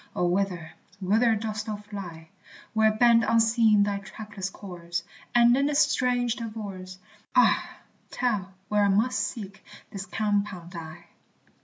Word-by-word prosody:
O, 180 Hz, -, +1 dB
whither, 175 Hz, -3 st, -1 dB, 0.3 s
whither 220 Hz, +4 st, +3 dB
dost 215 Hz, 0 st, -4 dB
thou 215 Hz, -, -2 dB
fly, 195 Hz, -6 st, -9 dB, 0.4 s
Where 220 Hz, -1 st, +4 dB
bend 230 Hz, +1 st, +5 dB
unseen 225 Hz, -2 st, +4 dB
thy 200 Hz, -1 st, -1 dB
trackless 200 Hz, -1 st, -7 dB
course, 175 Hz, -4 st, -6 dB, 0.3 s
And 240 Hz, 0 st, +6 dB
in 275 Hz, +2 st, +2 dB
this 295 Hz, -1 st, 0 dB
strange 250 Hz, -5 st, +2 dB
divorce, 200 Hz, -5 st, -7 dB, 0.4 s
Ah, -, -, +4 dB, 0.4 s
tell 210 Hz, -7 st, -1 dB, 0.2 s
where 210 Hz, -1 st, +2 dB
I -, -, +4 dB
must 220 Hz, +6 st, +2 dB
seek 200 Hz, -4 st, -5 dB, 0.3 s
this 195 Hz, 0 st, -6 dB
compound 200 Hz, -5 st, -2 dB
I? 165 Hz, 0 st, -9 dB
210 Hz, 135 wpm, -26 LUFS, 185-225 Hz, 0.4 s, And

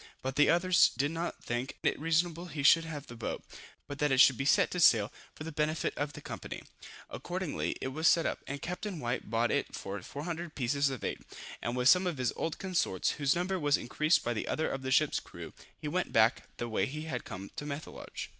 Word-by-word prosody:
But 130 Hz, 0 st, -2 dB
the 150 Hz, -1 st, +5 dB
others 175 Hz, +1 st, +5 dB
did 145 Hz, +3 st, +1 dB
not 165 Hz, +1 st, -4 dB
think 120 Hz, +3 st, -3 dB
it -, -, +1 dB
reasonable 165 Hz, +2 st, +1 dB
he 150 Hz, -3 st, -4 dB
should 165 Hz, +3 st, +6 dB
have 150 Hz, -3 st, -6 dB
the 120 Hz, -, -10 dB
boat, 115 Hz, -, -4 dB, 0.4 s
but 145 Hz, 0 st, -7 dB
that 150 Hz, -1 st, +2 dB
it 135 Hz, -, +3 dB
should 130 Hz, 0 st, +7 dB
be 135 Hz, -, -3 dB
set -, -, +4 dB
to 180 Hz, -, -2 dB
sale 115 Hz, -9 st, +5 dB, 0.2 s
for -, -, -8 dB
the 165 Hz, -, -5 dB
benefit 155 Hz, +1 st, -1 dB
of 145 Hz, 0 st, -2 dB
the -, -, -9 dB
company. -, -, -7 dB, 0.5 s
Accordingly 180 Hz, -2 st, -3 dB
it 130 Hz, -, -2 dB
was 160 Hz, +5 st, +1 dB
set 165 Hz, -, +5 dB
up, -, -, -1 dB
and 140 Hz, 0 st, -5 dB
Captain 180 Hz, +1 st, -4 dB
White 120 Hz, -4 st, -3 dB
bought 115 Hz, +1 st, +1 dB
it -, -, -1 dB
for 100 Hz, 0 st, -5 dB
400 165 Hz, -, -6 dB
pieces 140 Hz, +2 st, +1 dB
of 130 Hz, -4 st, -6 dB
eight, -, -, -3 dB, 0.4 s
and 120 Hz, +1 st, -2 dB
with 125 Hz, 0 st, +2 dB
some 180 Hz, +5 st, +6 dB
of 170 Hz, -5 st, -2 dB
his 125 Hz, -1 st, 0 dB
old 160 Hz, -, -2 dB
consorts, 180 Hz, -, 0 dB
whose 140 Hz, -2 st, +1 dB
number 185 Hz, +2 st, -1 dB
was 145 Hz, -2 st, +3 dB
increased 155 Hz, +6 st, +1 dB
by 120 Hz, -, -1 dB, 0.2 s
others 160 Hz, -, -1 dB
of 135 Hz, -, -4 dB
the 130 Hz, -, -3 dB
ship's 150 Hz, +2 st, +3 dB
crew, -, -, -10 dB, 0.2 s
he -, -, -6 dB
went -, -, -1 dB
back -, -, +3 dB
the 120 Hz, -, -3 dB
way 110 Hz, -4 st, 0 dB
he 155 Hz, +3 st, -5 dB
had 135 Hz, -7 st, -4 dB
come 100 Hz, -1 st, -8 dB
to -, -, -5 dB
Methelage. 145 Hz, +1 st, -6 dB
145 Hz, 225 wpm, -31 LUFS, 130-165 Hz, 0.5 s, should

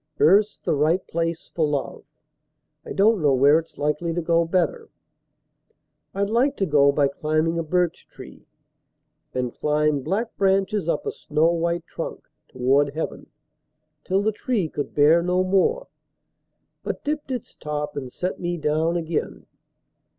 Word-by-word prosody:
Earth's 200 Hz, +7 st, +4 dB
the -, -, -1 dB
right 155 Hz, +5 st, +1 dB
place 165 Hz, 0 st, -3 dB
for 165 Hz, -, 0 dB
love: 145 Hz, -2 st, -3 dB, 0.8 s
I -, -, -9 dB
don't 210 Hz, 0 st, +3 dB
know 145 Hz, -3 st, +3 dB
where 140 Hz, +4 st, +5 dB
it's 165 Hz, -, -13 dB
likely 150 Hz, +3 st, -1 dB
to 175 Hz, -, 0 dB
go 170 Hz, 0 st, +2 dB
better. 190 Hz, -, -1 dB, 1.3 s
I'd 200 Hz, +1 st, -1 dB
like 265 Hz, +5 st, +2 dB
to 195 Hz, -, +1 dB
go 145 Hz, -4 st, +4 dB
by 140 Hz, 0 st, +2 dB
climbing 155 Hz, +4 st, -1 dB
a -, -, -1 dB
birch 175 Hz, +1 st, -1 dB
tree, 130 Hz, +3 st, -13 dB, 0.9 s
And 125 Hz, -1 st, -2 dB
climb 150 Hz, -1 st, +1 dB
black 200 Hz, -, -2 dB
branches 195 Hz, -1 st, +1 dB
up -, -, -1 dB
a -, -, -1 dB
snow 155 Hz, +3 st, +1 dB
white 170 Hz, 0 st, -1 dB
trunk -, -, -7 dB, 0.2 s
Toward 140 Hz, +3 st, +1 dB
heaven, 160 Hz, -, -4 dB, 0.8 s
till 195 Hz, +2 st, 0 dB
the 220 Hz, -, +2 dB
tree 215 Hz, -4 st, -1 dB
could 145 Hz, -, -5 dB
bear 150 Hz, +4 st, +5 dB
no 180 Hz, +1 st, +1 dB
more, 195 Hz, -, +1 dB, 1.0 s
But -, -, -5 dB
dipped 295 Hz, -1 st, -3 dB
its 250 Hz, -4 st, -5 dB
top 150 Hz, -1 st, -4 dB
and 130 Hz, -3 st, -5 dB
set 180 Hz, +7 st, -4 dB
me 175 Hz, 0 st, -2 dB
down 160 Hz, +2 st, 0 dB
again. 165 Hz, -1 st, -3 dB
165 Hz, 150 wpm, -23 LUFS, 150-190 Hz, 1.3 s, where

